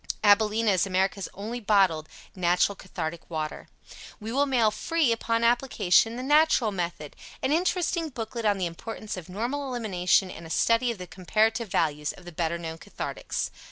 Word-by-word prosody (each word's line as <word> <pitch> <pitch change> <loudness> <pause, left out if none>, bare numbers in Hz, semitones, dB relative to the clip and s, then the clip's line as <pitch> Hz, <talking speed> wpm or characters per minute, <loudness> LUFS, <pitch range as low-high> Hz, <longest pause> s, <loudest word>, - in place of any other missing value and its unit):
AbilenA 215 +1 +4
is 185 +1 +2
America's 190 +1 0
Only 220 +5 -5
Bottled 190 -8 +2 0.3
Natural 180 +2 +2
Cathartic 170 -3 -6
Water. 155 -2 -4 0.5
We 220 +1 -6
will 280 +3 +2
mail, 235 -5 +3
free, 325 +1 +1
upon 230 0 0
application, 230 -3 +3
"The 250 - -5
Natural 295 -5 +4
Method," 170 -6 -4 0.3
an 265 - +1
interesting 340 0 +1
booklet 230 -2 -5
on 205 -2 +2
the 185 - -1
importance 210 +5 -6
of 185 -2 -9
normal 245 +9 -3
elimination 190 -6 +1
and 165 -2 -9
a - - -12
study 230 +7 +2
of 230 - -6
the 180 - -7
comparative 220 +6 0
values 150 -5 0
of 180 - -15
the 175 - -8
better 170 +1 -1
known 165 -1 -6
cathartics. - - -4
210 Hz, 165 wpm, -27 LUFS, 180-235 Hz, 0.5 s, AbilenA